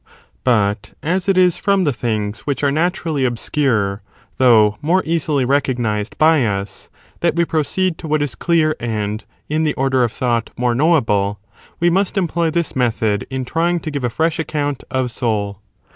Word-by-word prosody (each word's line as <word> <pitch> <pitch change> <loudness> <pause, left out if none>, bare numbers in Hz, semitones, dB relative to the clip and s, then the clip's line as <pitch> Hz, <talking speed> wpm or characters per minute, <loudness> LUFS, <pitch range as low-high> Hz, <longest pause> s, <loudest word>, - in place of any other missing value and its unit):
But, 105 -5 +1
as 180 +4 0
it 195 - +3
is 180 -2 +4
from 200 -2 +2
the 145 -5 +1
things 110 -3 -2
which 140 0 -3
are 140 - +3
naturally 160 -2 0
obscure, 120 -4 0 0.4
though 115 -5 +6
2 105 - -18
more 175 +5 +2
easily 155 -5 0
recognised 120 -6 0
by 155 -3 +4
us, 100 -3 -3 0.3
that 170 -2 +1
we 170 0 +2
proceed 165 +3 -1
to 160 - -7
what 150 -1 +1
is 145 - -3
clear 160 -2 +1
and, 110 -2 -3 0.2
in 155 +2 0
the 150 -2 0
order 130 -1 +2
of 120 - 0
thought, 120 -2 -1
more 125 -1 +1
knowable, 115 -9 +2 0.4
we 175 0 +3
must 195 +3 0
employ 170 -2 +1
this 170 0 -2
method 110 -5 0
in 130 -1 -3
trying 170 +5 0
to 155 - -5
give 140 -2 -4
a 120 - +1
fresh 160 +7 0
account 145 -3 -2
of 130 -2 -1
soul. 105 -4 -2
140 Hz, 175 wpm, -19 LUFS, 115-160 Hz, 0.4 s, though